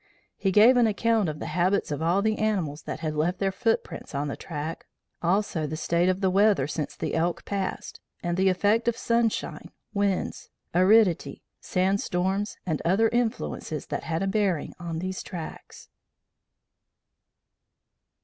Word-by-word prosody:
He 195 - 0
gave 225 +6 +7
an 240 -2 +5
account 220 -2 +1
of 150 - -5
the - - -6
habits 180 +3 +1
of 145 - -2
all 175 +5 +2
the 220 0 +1
animals 185 -9 -1
that - - -6
had 155 -2 -2
left 165 +4 0
their 195 0 0
footprints 225 - -2
on 145 +1 -1
the - - -3
track, 155 0 -6 0.3
also 175 -2 +1
of - - -4
the 155 - -4
state 170 +2 +1
of 185 +1 0
the 190 -1 +2
weather 200 -6 +4
since 150 0 -4
the - - -3
elk 170 +1 0
passed, 195 -2 -4 0.2
and 175 -1 0
the 190 +1 +3
effect 210 +5 +2
of 235 -1 +1
sunshine, 230 -1 -1 0.2
winds, 200 -2 -1 0.2
aridity, 185 0 +3 0.2
sand 190 +2 +1
storms, 190 +4 -1
and 160 -5 -1
other 200 +6 +3
influences 225 - -2
that - - -4
had 165 +2 -1
a - - 0
bearing 195 -6 0
on 170 -2 -4
these 185 +2 -3
tracks." 170 -5 -9
185 Hz, 160 wpm, -26 LUFS, 165-210 Hz, 0.3 s, gave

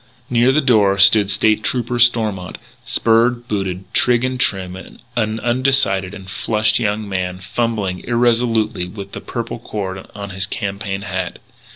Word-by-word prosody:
Near 120 +1 +4
the 150 +3 +3
door 105 -7 +3
stood 100 +1 +6
State 105 +1 +2
Trooper 120 -1 -1
Stormont, 110 -6 +1 0.3
spurred, 120 +1 +2
booted, 95 -3 -2
trig 120 -1 +3
and 130 0 -2
trim, 95 -5 0
an 110 +3 -4
undecided 120 -7 +1
and 95 -2 -11
flushed 105 +4 +1
young 105 -2 -1
man, 90 -2 -3
fumbling 100 -1 -2
irresolutely 115 -5 +1
with 100 +1 -9
the - - -7
purple 120 -1 -5
cord 95 -4 -5
on 100 -1 -6
his 95 +1 -2
campaign 100 -2 -4
hat. 95 -2 -4
105 Hz, 145 wpm, -18 LUFS, 95-120 Hz, 0.3 s, stood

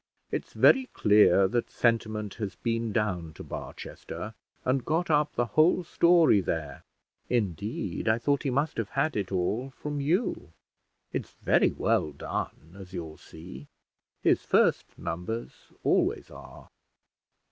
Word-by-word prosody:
It's - - -4
very 265 -1 +5
clear 105 -2 +5
that 120 +5 -1
Sentiment 110 -3 0
has 100 -3 -3
been 115 -1 -2
down 95 -7 -1
to - - -10
Barchester, - - -7 0.3
and 130 0 +1
got 165 +2 0
up 150 0 +2
the 120 - +1
whole 155 - +3
story 170 - +4
there; 75 -6 -4 0.5
indeed, 100 -4 -2
I 110 +1 +4
thought 140 +4 +1
he 140 - -1
must 140 +4 0
have 110 -3 -2
had 145 +3 0
it 100 -3 -2
all 100 +8 -1
from 145 +2 -5
you; 160 - -1 0.6
it's - - -4
very - - +4
well 75 - 0
done, 80 +4 -5
as 95 -1 -11
you'll 80 -4 -6
see: 80 -4 -11 0.6
his - - +3
first - - +2
numbers 90 +8 -6
always - - +1
are." - - -13
110 Hz, 135 wpm, -28 LUFS, 90-140 Hz, 0.6 s, very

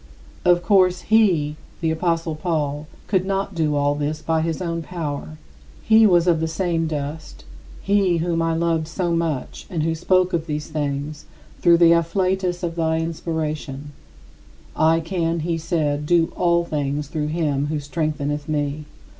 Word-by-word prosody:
" - - -24
Of 175 0 +2
course, 185 -1 +3
he 180 -9 +2 0.2
[the 165 -2 0
apostle 165 0 -1
Paul] 155 -2 -2 0.2
could 190 -3 +1
not 195 +1 -2
do 155 -3 0
all 145 0 +2
this 150 +1 -2
by 160 +1 0
his 165 0 -2
own 170 -2 -2
power. 145 - -5 0.5
He 220 0 +6
was 175 -3 +4
of 170 -3 +3
the 160 - 0
same 165 -1 -1
dust 150 0 -5 0.4
he 195 -3 +2
whom 165 0 0
I 165 0 +1
loved 165 -1 0
so 170 +1 -1
much 160 -6 -3
and 165 -4 -2
who 165 +1 +1
spoke 185 +3 +2
of 165 -1 -1
these 150 -1 -4
things 145 0 -3 0.3
through 170 0 +5
the 170 -1 +6
afflatus 180 +2 0
of 165 -1 -2
thy 160 -1 +1
inspiration: 155 -3 -4 0.8
"I 160 +1 +3
can," 165 -1 -1
he 165 +1 -1
said, 150 -3 -1
"do 170 -1 +2
all 170 -1 +2
things 145 -2 -2
through 150 0 -3
him 150 -3 0
who 150 0 -2
strengtheneth 150 -1 -3
me." 150 0 -2
165 Hz, 165 wpm, -22 LUFS, 150-175 Hz, 0.8 s, He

